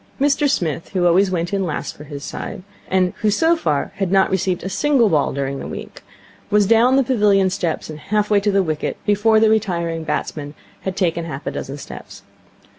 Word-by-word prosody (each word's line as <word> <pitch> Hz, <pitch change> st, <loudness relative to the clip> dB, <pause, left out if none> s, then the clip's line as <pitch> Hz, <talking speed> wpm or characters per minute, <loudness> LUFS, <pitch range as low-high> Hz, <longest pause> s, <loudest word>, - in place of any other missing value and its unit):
Mr 285 Hz, +1 st, +2 dB
Smith, 165 Hz, -, -1 dB
who 180 Hz, -2 st, +1 dB
always 185 Hz, +3 st, +4 dB
went 175 Hz, 0 st, -2 dB
in 195 Hz, -1 st, +1 dB
last 160 Hz, -5 st, -4 dB
for 150 Hz, -, -11 dB
his 140 Hz, -1 st, -8 dB
side, -, -, -6 dB, 0.2 s
and 185 Hz, -1 st, +1 dB
who 215 Hz, -, +3 dB
so 325 Hz, +11 st, +3 dB
far 150 Hz, -, -1 dB
had 195 Hz, -2 st, -1 dB
not 195 Hz, -1 st, +3 dB
received 185 Hz, -1 st, 0 dB
a -, -, -3 dB
single 240 Hz, +3 st, +2 dB
ball 150 Hz, -5 st, +2 dB
during 140 Hz, 0 st, -3 dB
the -, -, -6 dB
week, -, -, -8 dB, 0.5 s
was 210 Hz, -1 st, +4 dB
down 230 Hz, +5 st, +4 dB
the 270 Hz, -, +4 dB
pavilion 205 Hz, -6 st, +3 dB
steps 175 Hz, -3 st, -2 dB
and 155 Hz, -1 st, -8 dB
half 210 Hz, +5 st, -1 dB
way 205 Hz, -, +5 dB
to 205 Hz, +1 st, 0 dB
the 195 Hz, -1 st, +3 dB
wicket 155 Hz, -3 st, -3 dB
before 215 Hz, +2 st, +3 dB
the 220 Hz, -, +4 dB
retiring 170 Hz, -7 st, 0 dB
batsman 150 Hz, -1 st, -4 dB, 0.2 s
had 190 Hz, -1 st, -4 dB
taken 170 Hz, -3 st, 0 dB
half 150 Hz, -4 st, -7 dB
a -, -, -2 dB
dozen 135 Hz, +1 st, -6 dB
steps. 140 Hz, -, -10 dB
190 Hz, 205 wpm, -20 LUFS, 165-210 Hz, 0.5 s, way